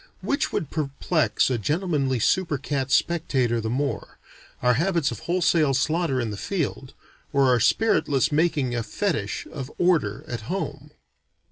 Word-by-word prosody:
Which 280 - -1
would 150 - -3
perplex 155 0 0
a 120 - 0
gentlemanly 145 - 0
super 165 - +1
cat 135 -1 -2
spectator 135 -8 +1
the 110 - -3
more, 135 0 -3 0.5
our 125 0 +5
habits 170 +1 +1
of 115 - -6
wholesale 170 -5 +3
slaughter 155 0 +1
in 115 -3 -2
the 100 - -5
field, 140 - -3 0.4
or 140 -2 +3
our 125 -2 +4
spiritless 145 - +2
making 150 -5 +1
a 120 - -1
fetish 160 - -2
of 135 -2 -6
"order," 155 - +1
at 120 -2 -4
home? 190 +2 -4
140 Hz, 145 wpm, -24 LUFS, 125-170 Hz, 0.5 s, our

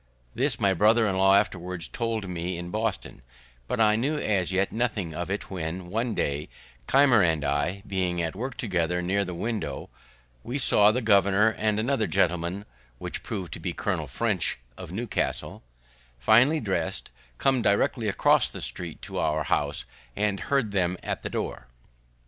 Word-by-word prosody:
This 125 0 0
my 100 -3 +3
brother 110 +5 +4
in 100 -3 0
law 95 +1 +5
afterwards 90 -4 -1
told 115 -4 -3
me 90 0 -3
in 85 0 -6
Boston, 110 -1 -3 0.5
but 125 - -2
I 105 -1 +5
knew 140 +7 0
as 95 - 0
yet 95 +1 +1
nothing 110 -8 -1
of 85 +3 -4
it; 100 +1 -4
when, 90 0 -5
one 115 +2 -1
day, 70 +1 -2 0.4
Keimer 135 -5 +5
and 80 -4 +1
I 75 +8 -1
being 90 -3 -1
at 80 +1 -2
work 125 +5 -5
together 90 -4 -1
near 100 +3 +1
the 90 -2 -5
window, 110 +4 -4 0.5
we 125 - -4
saw 105 -6 +5
the 125 +2 -1
governor 100 0 +4
and 105 -1 0
another 120 -1 +1
gentleman 90 +1 0 0.3
(which - - -5
proved 95 -5 -5
to - - -6
be - - -3
Colonel - - -2
French, - - 0 0.2
of - - -9
Newcastle), 115 +6 -3 0.6
finely 120 - +5
dress'd, 95 - -3 0.3
come 135 -2 +2
directly 110 +3 +1
across 100 - +3
the - - -8
street 85 -3 -6
to - - -4
our 75 0 +1
house, 70 0 -1 0.3
and 100 -1 0
heard 125 +2 0
them 90 -2 0
at - - -3
the - - -4
door. - - -4
100 Hz, 165 wpm, -26 LUFS, 90-110 Hz, 0.6 s, law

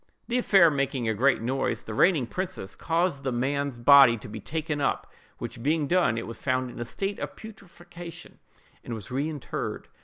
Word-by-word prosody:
The 245 +1 +1
affair 190 -8 +5
making 135 -4 -1
a 110 - +2
great 125 +2 +2
noise, 130 +3 -1
the 110 - -7
reigning 160 - +3
princess 185 - -5
caused 170 -3 0
the 135 -1 -2
man's 135 +2 -1
body 130 -1 +7
to 105 - -10
be 110 +1 -7
taken 155 - -3
up, - - 0 0.3
which - - -7
being 150 +3 +1
done, 170 -8 +2
it 115 - -3
was 115 - -7
found 130 -1 0
in - - -10
a 120 - -3
state 195 - -3
of - - -5
putrefaction, 175 -5 -11 0.4
and 115 - -5
was 110 0 -9
reinterred. 145 +2 -4
140 Hz, 185 wpm, -27 LUFS, 120-170 Hz, 0.4 s, body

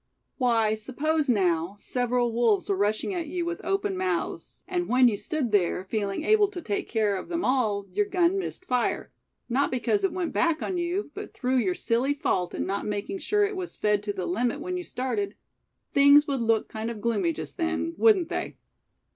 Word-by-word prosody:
"Why, 230 -4 +3
suppose 285 +7 -1
now, 180 -4 +1
several 245 +1 0
wolves 230 -3 +2
were 200 - +2
rushing 210 - 0
at 340 -3 -3
you 345 +2 -2
with 345 0 -4
open 390 +2 0
mouths; 370 +1 -3
and 355 -2 -1
when 250 0 +6
you 225 - +2
stood 290 - -2
there, 185 -2 +2
feeling 200 +4 -2
able 425 +2 +4
to 390 -3 -7
take 210 -11 -3
care 215 -3 +1
of 190 - -5
them 340 0 -1
all, 215 -6 +1
your 415 - 0
gun 370 -1 +2
missed 370 -1 -5
fire, 250 -5 -1 0.4
not 265 +4 +1
because 260 - 0
it 390 - +2
went 360 -2 -3
back 330 -2 +1
on 365 -2 -2
you, 350 +4 -2
but - - -8
through 260 0 0
your 360 +8 +1
silly 255 +2 +1
fault 180 -10 -1
in - - -2
not 200 +2 -2
making 210 - -3
sure 415 +5 +2
it 405 0 -3
was 370 -2 -5
fed 210 -1 +1
to 205 0 -3
the 185 -3 -4
limit 240 +9 0
when 365 +4 -4
you 360 - -3
started; 305 +9 -3 0.6
things 285 +1 +7
would 275 -4 -1
look 225 -1 +2
kind 220 +1 -4
of 230 -2 -6
gloomy 235 +8 +1
just - - -7
then, 330 -1 -1
wouldn't 395 -6 +4
they?" - - -4
260 Hz, 200 wpm, -27 LUFS, 220-355 Hz, 0.6 s, things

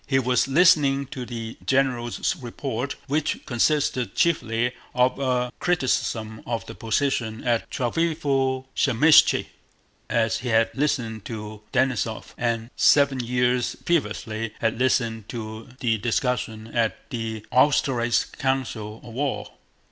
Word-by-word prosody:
He 135 - +2
was 125 0 +2
listening 140 -2 +4
to 125 -4 -6
the 115 -1 -6
general's 130 -3 0
report—which 140 +4 -3
consisted 125 -3 +1
chiefly 120 -7 +1 0.2
of 125 +1 +2
a 125 -2 0
criticism 120 -9 0
of 115 -1 -2
the 115 - -8
position 115 -1 -1
at 120 -2 0
Tsárevo 135 -2 0
Zaymíshche—as 120 -4 +2
he 125 - -4
had 115 0 +3
listened 120 -7 -1
to 105 -2 -7
Denísov, 120 -4 -1
and 115 0 -2
seven 140 -2 +4
years 125 0 +1
previously 115 -9 -1
had 115 +1 0
listened 115 -4 0
to 110 0 -7
the 115 -4 +1
discussion 115 -1 -1
at 115 -2 -1
the 110 -2 -4
Austerlitz 125 -3 +3
council 115 -5 -3
of 115 - -10
war. 140 +3 -2
125 Hz, 115 wpm, -24 LUFS, 115-135 Hz, 0.2 s, listening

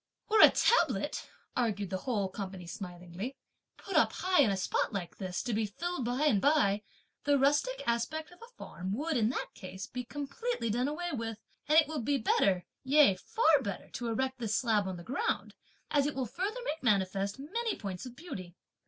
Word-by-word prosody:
"Were 430 0 +6
a - - +11
tablet," 485 - +2 0.3
argued 205 -6 0
the 190 - -1
whole 210 -6 -1
company 190 -2 -6
smilingly, 180 +6 -6 0.4
"put 390 - -7
up - - +4
high 365 -3 +3
in 245 - +4
a 195 - 0
spot 185 - 0
like 190 -5 -5
this, 185 -1 -3
to 245 - -2
be 215 0 +1
filled 300 - -3
up 245 - -1
by 300 - +2
and 210 -10 +4
by, 275 -9 +3 0.4
the 285 0 +4
rustic 295 - +2
aspect 235 +8 -1
of 355 - -17
a 465 +1 -12
farm 185 +2 -5
would 305 +7 -1
in 225 -3 +3
that 250 - -3
case 190 +1 -7
be 250 0 -5
completely 285 - -3
done 245 +4 +1
away 345 +4 -3
with; 225 -5 -3 0.3
and 305 +2 +5
it 320 - +7
will 310 -3 -3
be 280 +5 +1
better, 195 -6 +2 0.2
yea 280 -5 +6
far 310 - +3
better 200 -6 -5
to 240 - -4
erect 260 +3 -1
this 220 -3 -1
slab 215 -5 +2
on 185 -1 -4
the 170 - -9
ground, 255 +9 -2 0.4
as 285 -1 +3
it 295 - -3
will 265 -1 -1
further 395 - -3
make 315 -5 -2
manifest 200 -2 +1
many 430 - -2
points 190 -4 -5
of 250 -1 -8
beauty. 190 - -8
245 Hz, 200 wpm, -31 LUFS, 200-295 Hz, 0.4 s, a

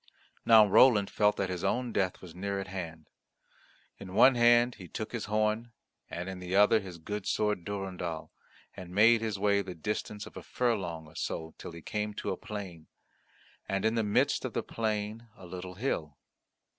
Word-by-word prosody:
Now 110 -2 +9
Roland 105 0 +5
felt 105 0 +2
that 95 -2 -1
his 90 -2 -4
own 125 -2 0
death 95 -2 -1
was 85 -3 -10
near 100 +2 -3
at 95 - -4
hand. 85 -4 -6 0.9
In 95 -1 -8
one 130 +4 +7
hand 120 0 +5
he 90 - -9
took 110 +5 -5
his 115 -3 -3
horn, 110 +2 0 0.4
and 85 +1 -5
in 95 -1 -6
the 90 +1 -3
other 105 +2 +6
his 95 -4 -9
good 105 +4 -5
sword 105 -4 0
Durendal, 95 -5 -4 0.4
and 90 -1 -9
made 115 +2 +6
his 110 -3 -2
way 100 0 +2
the 95 -2 -7
distance 105 +4 -4
of - - -13
a - - -7
furlong 95 -10 -1
or 75 - -16
so 80 0 -4
till - - -7
he 85 0 -11
came 105 -1 -3
to - - -3
a - - -1
plain, 100 -8 -8 0.8
and 95 +1 0
in 110 - +3
the 115 - +1
midst 105 -1 +2
of - - -4
the - - -1
plain 110 +1 -3
a - - -12
little 90 +1 -7
hill. 80 - -3
100 Hz, 190 wpm, -30 LUFS, 90-110 Hz, 0.9 s, Now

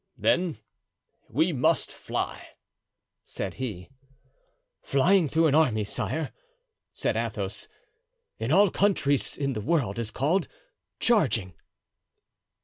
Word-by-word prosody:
"Then 175 -4 +1 0.7
we 160 +8 +1
must 130 -3 +1
fly!" - - -5 0.7
said - - -5
he. 105 -5 -5 0.9
"Flying 170 +5 +3
through 160 +4 +2
an 150 - +3
army, 130 -9 +3
sire," 155 +9 -3 0.6
said - - -1
Athos, - - -3 0.7
"in - - -2
all 200 -2 +5
countries 150 -9 +1
in 140 -2 -1
the 110 - -3
world 125 -7 0
is 115 -2 -2
called 150 +11 0 0.5
charging." 115 - +2
145 Hz, 105 wpm, -27 LUFS, 115-170 Hz, 0.9 s, all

